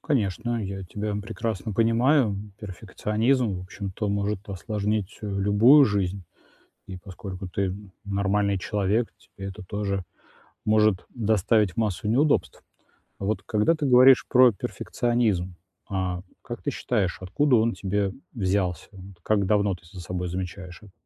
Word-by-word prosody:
Конечно, 120 - -1
я 95 0 -5
тебя 105 +3 -4
прекрасно 110 0 -4
понимаю. 115 +1 +3 0.2
Перфекционизм, 105 +4 -1
в 90 - -5
общем-то, 100 +2 -5
может 100 0 -2
осложнить, 105 +1 -2
э, 105 - -5
любую 105 +8 +5
жизнь, 100 -3 -1 0.7
и 95 - -7
поскольку 95 0 -8
ты 95 +1 -1 0.3
нормальный 100 0 +1
человек, 105 +4 0
тебе 100 0 -10
это 100 0 -8
тоже 100 0 -2 0.6
может 105 -3 +3
доставить 110 -3 +1
массу 110 -2 -1
неудобств. 125 - +1 0.6
Вот 105 +2 -2
когда 110 +9 +2
ты 150 -2 -2
говоришь 130 0 +7
про 125 -1 +6
перфекционизм, 105 -3 -1 0.3
а 95 -2 -2 0.2
как - - -7
ты - - -1
считаешь, 100 -8 -1
откуда 130 +8 +2
он 115 +1 +2
тебе 100 0 -1 0.2
взялся? 95 - -1
Вот 95 -1 -12
как 105 -2 +2
давно 100 -1 +2
ты 85 - -19
за 95 - -9
собой 90 0 -4
замечаешь 90 0 -6
это? 100 -3 -15
100 Hz, 135 wpm, -25 LUFS, 95-110 Hz, 0.7 s, говоришь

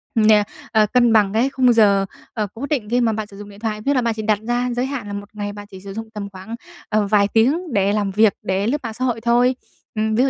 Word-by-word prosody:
nè, 215 -2 +5 0.3
ờ, 215 -2 +4
cân 240 -2 +4
bằng 205 -3 +3
cái 240 +5 +2
khung 255 -3 +3
giờ, 200 -3 +4 0.3
ờ, 210 -2 -2
cố 235 +5 -5
định 245 -9 -1
khi 245 +2 +2
mà 230 -2 +2
bạn 215 -1 -4
sử 200 -1 -14
dụng 205 0 -9
điện 200 - -14
thoại, 215 -1 -3
nghĩa 285 - +3
là 255 - +3
bạn 230 -1 0
chỉ 220 - -5
đặt 210 -1 +1
ra 245 +1 0
giới 245 +2 -1
hạn 265 -6 -5
là 205 - -6
1 200 +1 -6
ngày 205 -1 -4
bạn 205 0 -10
chỉ 190 - -10
sử 195 0 -8
dụng 225 +1 -6
tầm 200 -2 -5
khoảng, 190 +4 -8 0.3
ờ, 215 -1 +1
vài 200 -1 +3
tiếng 280 +7 +2
để 200 0 +2
làm 205 -2 0
việc, 215 +1 +4
để 190 +3 -1
lướt 285 - +1
mạng 225 -2 -4
xã 255 +3 -2
hội 230 -3 -1
thôi. 245 +2 +3 0.4
Ừm, 220 0 0
ví 245 - +3
dụ 270 - +2
220 Hz, 285 wpm, -20 LUFS, 205-240 Hz, 0.4 s, nè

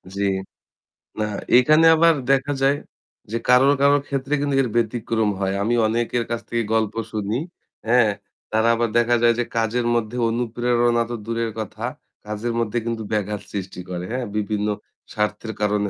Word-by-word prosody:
জ্বি। 100 0 +1 0.9
না 105 - +1 0.3
এখানে 155 +6 +5
আবার 165 +1 +5 0.2
দেখা 135 +1 +2
যায় 135 +1 +3 0.5
যে 115 - 0
কারো, 125 +2 +6
কারোর, 140 0 +5
ক্ষেত্রে 135 +1 -2
কিন্তু 145 -1 0
এর 125 - -1
ব্যতিক্রম 115 -1 0
হয়। 95 0 -1
আমি 115 +3 +1
অনেকের 120 +2 0
কাছ 115 0 -2
থেকে 115 0 0
গল্প 110 -2 +1 0.2
শুনি, 105 +1 -2 0.5
হ্যাঁ? 115 -2 +4 0.4
তারা 110 +1 +2
আবার 115 0 0
দেখা 120 +1 +3
যায় 120 0 +6
যে - - +2
কাজের 115 +2 0
মধ্যে 115 +1 -2
অনুপ্রেরণা 120 0 +1
তো 120 - -3
দূরের 115 0 -2
কথা 110 - -5 0.4
কাজের 105 +3 -3
মধ্যে 115 0 -1
কিন্তু 115 -1 -3
ব্যাঘাত 105 -1 -1
সৃষ্টি 95 -2 -5
করে, 90 -1 -4
হ্যাঁ? 125 0 -2
বিভিন্ন 105 0 -1 0.5
স্বার্থের 105 +1 -2
কারণে 105 -1 +1
115 Hz, 160 wpm, -22 LUFS, 105-120 Hz, 0.9 s, কারো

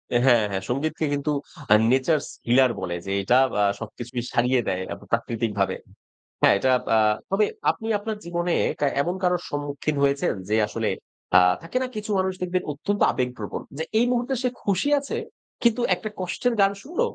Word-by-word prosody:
এ - - +7
হ্যাঁ, 120 -4 +6
হ্যাঁ। 95 -1 -2
সঙ্গীতকে 155 +5 -1
কিন্তু 145 +1 -1 0.6
নেচারস 135 +3 +2 0.2
হিলার 125 +1 +5
বলে 85 -2 -3
যে, 95 - -4
আ - - +1
এটা 125 +6 +4 0.4
সবকিছুকেই 120 +2 -6
সারিয়ে 125 +1 +3
দেয় 95 0 -1
আব - - -9
প্রাকৃতিকভাবে। 105 -4 0 0.7
হ্যাঁ, - - +6
এটা 130 - +1 0.3
আ - - +5 0.3
তবে 205 +2 +3 0.3
আপনি 225 - -8
আপনার 215 0 -4
জীবনে 175 0 -1 0.3
কা 145 - +2 0.2
এমন 175 +4 -1
কারোর 180 -1 +2
সম্মুখীন 145 +1 -3
হয়েছেন? 140 0 +2 0.2
যে 110 - +2
আসলে - - -2 0.5
আ - - +10 0.2
থাকে 165 +9 -4
না? 255 - -2
কিছু 215 0 -5
মানুষ 190 0 0
দেখবেন 180 0 -1
অত্যন্ত 200 +8 -3
আবেগপ্রবণ। 125 -5 -3 0.2
যে 160 - -2 0.2
এই 240 - +4
মুহূর্তে 245 +2 0
সে 250 - +2
খুশি 200 +8 +1
আছে, 285 +12 -4 0.5
কিন্তু 235 0 +3
একটা 215 - -6
কষ্টের 185 +7 -1
গান 195 0 +5
শুনল। 340 - -3
155 Hz, 170 wpm, -24 LUFS, 125-200 Hz, 0.7 s, আ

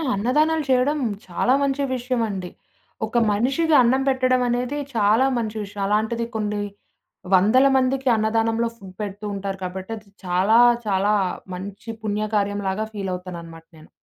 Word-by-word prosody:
అన్నదానాలు 300 +9 +2
చేయడం 265 +4 +3 0.3
చాలా 185 +8 +1
మంచి 280 0 0
విషయమండి. 230 -7 -2 0.6
ఒక 225 +2 -2
మనిషికి 270 +10 +2
అన్నం 255 +2 +3
పెట్టడం 255 -1 +2
అనేది 250 +4 -1 0.2
చాలా 220 +4 +4
మంచి 220 -2 -3
విషయం. 200 0 -7
అలాంటిది 220 +3 0
కొన్ని 210 -1 -1 0.7
వందల 220 +9 +5
మందికి 265 +1 0
అన్నదానంలో 225 +1 +1
ఫుడ్ 190 -3 -13
పెడుతూ 205 0 -5
ఉంటారు 195 0 -4
కాబట్టి, 185 +3 -6
అది 210 -1 -15 0.2
చాలా 190 +6 +3 0.3
చాలా 200 +1 +2 0.4
మంచి 200 +4 -8
పుణ్యకార్యంలాగా 205 -1 -1
ఫీలవుతాననమాట 180 -4 -6
నేను. 155 - -16
215 Hz, 125 wpm, -23 LUFS, 195-250 Hz, 0.7 s, వందల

